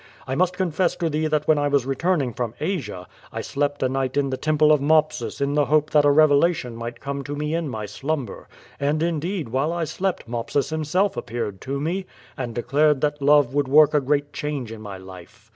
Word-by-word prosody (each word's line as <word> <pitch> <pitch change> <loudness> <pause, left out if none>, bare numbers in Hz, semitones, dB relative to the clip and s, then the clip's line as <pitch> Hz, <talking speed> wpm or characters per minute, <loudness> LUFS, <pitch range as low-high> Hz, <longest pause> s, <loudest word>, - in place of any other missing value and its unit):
I 130 - -3
must 180 +5 +1
confess 180 -1 0
to 165 -2 -2
thee 155 +1 0
that 150 -1 0
when 155 -2 +4
I 145 - +1
was 140 -3 +1
returning 135 -1 0
from 120 -1 -4
Asia, 140 - -3 0.3
I - - -4
slept 145 0 -2
a - - +3
night 130 0 -2
in 140 -1 +1
the - - 0
temple 155 +2 +3
of 150 -2 +4
Mopsus 155 +1 +1
in 140 0 0
the 145 -1 +3
hope 150 +2 +2
that 150 -1 +4
a - - +6
revelation 145 -3 +3
might 115 0 -6
come 140 0 -4
to 145 +2 -5
me 150 +1 -2
in 165 -3 -1
my 110 -4 -4
slumber. 135 0 -4 0.3
And 150 +3 0
indeed 170 - -2
while 135 +6 0
I 170 0 -2
slept 185 -1 -2
Mopsus 120 +5 -2
himself 160 +6 0
appeared 105 -4 -4
to 140 +1 -3
me, 180 +6 -2 0.3
and 120 -3 -5
declared 145 +3 +2
that 150 -1 -1
love 145 -2 +4
would 145 -1 +1
work 150 +2 +6
a 150 - +3
great 145 +1 0
change 145 -6 -4
in 110 -1 -8
my 100 -3 -7
life." 95 +3 -13
145 Hz, 215 wpm, -23 LUFS, 130-155 Hz, 0.3 s, a